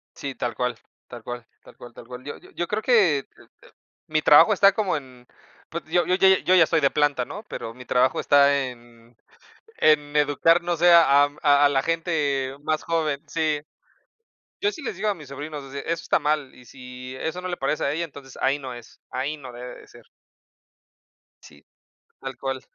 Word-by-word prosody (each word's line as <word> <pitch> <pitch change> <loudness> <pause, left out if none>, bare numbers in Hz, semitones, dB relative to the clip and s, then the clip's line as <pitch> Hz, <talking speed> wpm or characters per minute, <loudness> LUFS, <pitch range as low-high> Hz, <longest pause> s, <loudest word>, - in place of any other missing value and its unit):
Sí, 135 -1 -6
tal 120 -1 -3
cual 125 0 -1 0.3
tal 120 -2 -11
cual 120 -1 -7 0.2
tal - - -17
cual 120 -1 -12
tal 115 - -13
cual. 125 0 -9
Yo 145 - -7
yo - - -18
yo 175 - -3
creo 215 +1 -2
que, 195 - +4
eh, - - -11
eh, - - -18 0.6
mi 155 0 0
trabajo 150 +10 +7
está 200 0 +5
como 200 -5 0
en, 130 -3 -12 0.4
pues, 170 - -5
yo 175 +2 +1
yo 180 - +2
yo 190 - +4 0.2
yo 185 - +5
ya 165 -3 +6
soy 165 - +2
de 140 - +3
planta, 145 -4 +1
¿no? 195 - -8
Pero 115 - -6
mi 125 0 -13
trabajo 125 +1 +2
está 140 0 +4
en 120 -1 -17 0.6
en 150 -1 +3
educar, 150 +4 +3
no 175 0 -1
sé, 175 +1 +5
a 145 -4 +6
am, 145 0 -6
a 145 -1 +5
a - - +5
la 135 -1 +1
gente 145 -5 -1
más 155 0 -1
joven 155 -3 -1
Sí. 155 -1 -1 1.0
Yo 410 +1 +2
sí 315 -7 -10
les 210 - -4
digo 210 +3 -1
a 205 - -1
mis 155 -5 -13
sobrinos, 145 +1 -7
ese 140 - -4
eso 170 - -2
está - - +1
mal, 150 -3 -1
y 125 - -17
si 125 0 -10
eso 160 +3 -4
no 185 - -5
le 175 - -4
parece 145 +3 -1
a 140 - +1
ella, 170 - -2
entonces, 135 -3 -13
ahí 135 +2 +1
no 130 -2 -7
es, 120 -1 -14
ahí 135 +4 -3
no 130 -3 -10
debe 125 +1 -9
de - - -17
ser. - - -17 1.4
Sí, 70 0 -17 0.5
tal 135 -1 -7
cual. 135 -1 -3
145 Hz, 210 wpm, -24 LUFS, 130-165 Hz, 1.4 s, trabajo